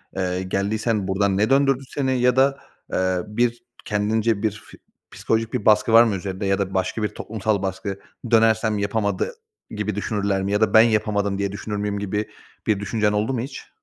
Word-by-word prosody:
Eee, 90 Hz, -1 st, -1 dB
geldiysen 100 Hz, +2 st, -1 dB
buradan 95 Hz, 0 st, +1 dB
ne 105 Hz, +4 st, +2 dB
döndürdü 135 Hz, -1 st, +3 dB
seni 130 Hz, -3 st, -1 dB
ya 125 Hz, 0 st, +3 dB
da, 135 Hz, +1 st, +3 dB, 0.3 s
eee, 95 Hz, 0 st, +1 dB
bir 120 Hz, +2 st, -1 dB, 0.2 s
kendince 105 Hz, +1 st, 0 dB
bir 110 Hz, -, +2 dB
fi 110 Hz, -, -14 dB, 0.3 s
psikolojik 115 Hz, 0 st, -1 dB
bir 125 Hz, -5 st, -2 dB
baskı 105 Hz, +1 st, +4 dB
var 115 Hz, +1 st, +9 dB
mı 110 Hz, -4 st, 0 dB
üzerinde 95 Hz, +1 st, -4 dB
ya 95 Hz, 0 st, +2 dB
da 95 Hz, -1 st, -2 dB
başka 95 Hz, +4 st, -1 dB
bir 105 Hz, -, +1 dB
toplumsal 105 Hz, -1 st, -2 dB
baskı, 95 Hz, +1 st, -4 dB, 0.3 s
dönersem 110 Hz, -1 st, +3 dB
yapamadı 100 Hz, -, -1 dB, 0.4 s
gibi 105 Hz, -1 st, -3 dB
düşünürler 100 Hz, -2 st, -1 dB
mi? 100 Hz, -, -2 dB
Ya 105 Hz, +1 st, +1 dB
da 105 Hz, -2 st, +2 dB
ben 110 Hz, -, +9 dB
yapamadım 105 Hz, -3 st, +1 dB
diye 100 Hz, -1 st, -1 dB
düşünür 105 Hz, +1 st, -5 dB
müyüm 100 Hz, 0 st, -2 dB
gibi 105 Hz, +1 st, -2 dB, 0.4 s
bir 105 Hz, -2 st, +2 dB
düşüncen 105 Hz, +1 st, 0 dB
oldu 105 Hz, +5 st, 0 dB
mu 125 Hz, -, -1 dB
hiç? 135 Hz, +2 st, -8 dB
105 Hz, 185 wpm, -22 LUFS, 100-115 Hz, 0.4 s, var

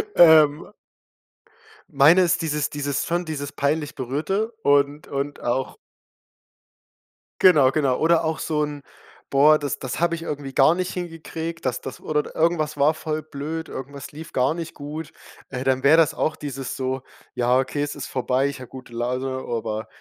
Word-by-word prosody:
Ähm 160 Hz, +1 st, +6 dB, 1.2 s
Meine 155 Hz, +6 st, +6 dB
ist 175 Hz, -1 st, +2 dB
dieses 150 Hz, -2 st, -1 dB
dieses 145 Hz, -1 st, -2 dB
son 175 Hz, +1 st, -1 dB
dieses 145 Hz, -3 st, -5 dB
peinlich 150 Hz, +1 st, -1 dB
Berührte 155 Hz, -, -2 dB
und 145 Hz, +1 st, +2 dB
und 140 Hz, +1 st, -4 dB
auch 130 Hz, +2 st, -2 dB, 1.6 s
genau, 145 Hz, -8 st, +6 dB
genau. 135 Hz, -4 st, +1 dB
Oder 165 Hz, 0 st, +3 dB
auch 160 Hz, 0 st, -1 dB
so 150 Hz, -2 st, 0 dB
'n: 145 Hz, -1 st, -5 dB, 0.5 s
„Boah 150 Hz, +3 st, +6 dB
das 145 Hz, -3 st, -3 dB
das 130 Hz, +2 st, -4 dB
habe 170 Hz, 0 st, +2 dB
ich 165 Hz, -, -8 dB
irgendwie 140 Hz, -3 st, -5 dB
gar 155 Hz, +5 st, +5 dB
nicht 185 Hz, 0 st, -2 dB
hin 175 Hz, -2 st, -4 dB
gekriegt. 165 Hz, 0 st, -7 dB
Das 125 Hz, -1 st, -1 dB
das 135 Hz, -, -7 dB
oder 150 Hz, -1 st, -2 dB
irgendwas 155 Hz, -3 st, +1 dB
war 145 Hz, +3 st, +4 dB
voll 155 Hz, 0 st, -3 dB
blöd, 155 Hz, +2 st, -5 dB
irgendwas 140 Hz, +1 st, -8 dB
lief 160 Hz, +2 st, -10 dB
gar 130 Hz, +3 st, +2 dB
nicht 165 Hz, -1 st, -6 dB
gut.“ 150 Hz, +2 st, -7 dB, 0.4 s
Äh 125 Hz, -1 st, -4 dB
dann 130 Hz, 0 st, +1 dB
wäre 150 Hz, +4 st, +6 dB
das 160 Hz, -3 st, +4 dB
auch 155 Hz, -, -1 dB
dieses 135 Hz, -3 st, -5 dB
so: 130 Hz, 0 st, -2 dB, 0.3 s
„Ja 125 Hz, +1 st, +2 dB
okay, 140 Hz, +2 st, -2 dB
es 145 Hz, 0 st, -3 dB
ist 140 Hz, -, -6 dB
vorbei. 130 Hz, +1 st, 0 dB
Ich 140 Hz, -2 st, -5 dB
habe 125 Hz, -, -10 dB
gute 130 Hz, -2 st, -11 dB
Laune, 125 Hz, +3 st, -2 dB
aber 110 Hz, -3 st, -4 dB
145 Hz, 170 wpm, -23 LUFS, 135-160 Hz, 1.6 s, Ähm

